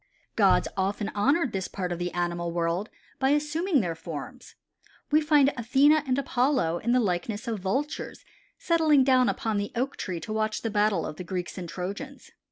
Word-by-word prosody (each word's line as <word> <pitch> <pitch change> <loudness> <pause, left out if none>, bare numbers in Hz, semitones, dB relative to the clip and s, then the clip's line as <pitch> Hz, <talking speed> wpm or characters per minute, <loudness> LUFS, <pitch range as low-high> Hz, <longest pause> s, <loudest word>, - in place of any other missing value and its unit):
Gods - - +4
often 200 +2 -1
honored 275 +6 +2
this 190 -1 -2
part 180 -3 -4
of 175 - -3
the 175 0 -2
animal 175 -1 -2
world 170 +4 -1 0.3
by 265 - +2
assuming 300 +2 +1
their 175 -4 -2
forms. 160 -3 -8 0.6
We 305 +1 +5
find 295 -2 +4
Athene 265 +5 +4
and 280 -4 +1
Apollo 250 - +1
in 235 - -1
the 250 - +4
likeness 205 +3 -2
of 225 -3 -2
Vultures 260 +11 -3 0.3
settling 315 -5 +3
down 255 -1 +4
upon 220 -2 -1
the 205 0 -2
Oak 260 +4 -2
tree 180 -3 -4
to 215 - -5
watch 215 0 -1
the 225 - -2
battle 205 -4 +1
of 155 - -6
the - - -6
Greeks 180 0 -4
and 180 -3 -6
Trojans. 200 - -6
215 Hz, 180 wpm, -27 LUFS, 180-275 Hz, 0.6 s, We